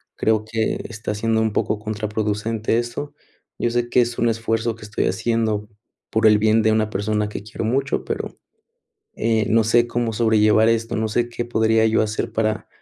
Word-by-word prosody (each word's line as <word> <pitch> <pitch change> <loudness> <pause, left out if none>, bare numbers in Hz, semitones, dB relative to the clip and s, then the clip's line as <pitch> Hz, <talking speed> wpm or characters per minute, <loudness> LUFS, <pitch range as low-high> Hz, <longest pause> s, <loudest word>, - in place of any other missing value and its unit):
creo 110 -1 +1
que 110 0 -2
está 105 -1 -4
siendo 110 +1 0
un 110 -2 0
poco 105 - 0
contraproducente 105 +1 -2
esto. 120 +5 -5 0.5
Yo 120 - 0
sé 120 0 -1
que 125 - +4
es 120 0 -2
un 120 - +2
esfuerzo 115 0 -1
que 115 - -14
estoy 105 0 -2
haciendo 110 -2 -1 0.4
por 110 0 +3
el 105 -1 +6
bien 110 +1 +3
de 110 - +3
una 110 -1 +1
persona 105 +1 -1
que 105 - -6
quiero 110 - -6
mucho, 135 +4 0
pero, - - -4 0.8
eh, 110 -2 +1
no 115 0 +4
sé 120 +1 +3
cómo 120 -1 -1
sobrellevar 110 -1 +4
esto, 115 0 0
no 110 0 0
sé 120 +2 0
qué 120 0 -4
podría 110 -1 +2
yo 110 0 +3
hacer 105 -1 -2
para, 110 -2 -1
110 Hz, 185 wpm, -21 LUFS, 110-115 Hz, 0.8 s, el